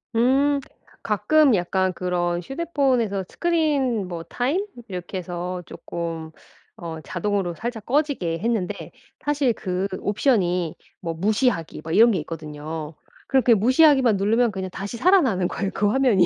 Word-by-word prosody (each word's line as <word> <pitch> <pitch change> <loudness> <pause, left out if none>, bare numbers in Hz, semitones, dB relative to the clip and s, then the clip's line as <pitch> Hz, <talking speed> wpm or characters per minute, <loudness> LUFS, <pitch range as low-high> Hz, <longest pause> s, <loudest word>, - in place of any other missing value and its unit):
음. 275 +5 +3 0.4
가끔 245 +5 +4
약간 185 +1 0
그런 175 -1 -1
휴대폰에서 265 - 0
스크린 290 - +1
뭐 170 -2 -5
타임 275 - -1 0.2
이렇게 180 0 -5
해서 180 0 -5
쪼끔 165 -2 -6 0.4
어 165 -2 -7
자동으로 185 0 -2
살짝 225 0 -5
꺼지게 260 - 0
했는데 220 -3 -2 0.3
사실 290 -4 +1
그 185 -2 -2
옵션이 185 - +1 0.2
뭐 165 -2 -4
무시하기 200 - 0
뭐 160 +1 -4
이런 230 +4 +7
게 185 - 0
있거든요. 155 0 -6 0.3
그렇게 255 -3 +4
무시하기만 255 0 +5
누르면 225 +4 +2
그냥 190 -1 -4
다시 195 +5 -6
살아나는 260 - +3
거예요 195 +1 -3
그 205 - +1
화면이. 225 -7 +4
200 Hz, 305 characters per minute, -23 LUFS, 175-255 Hz, 0.4 s, 이런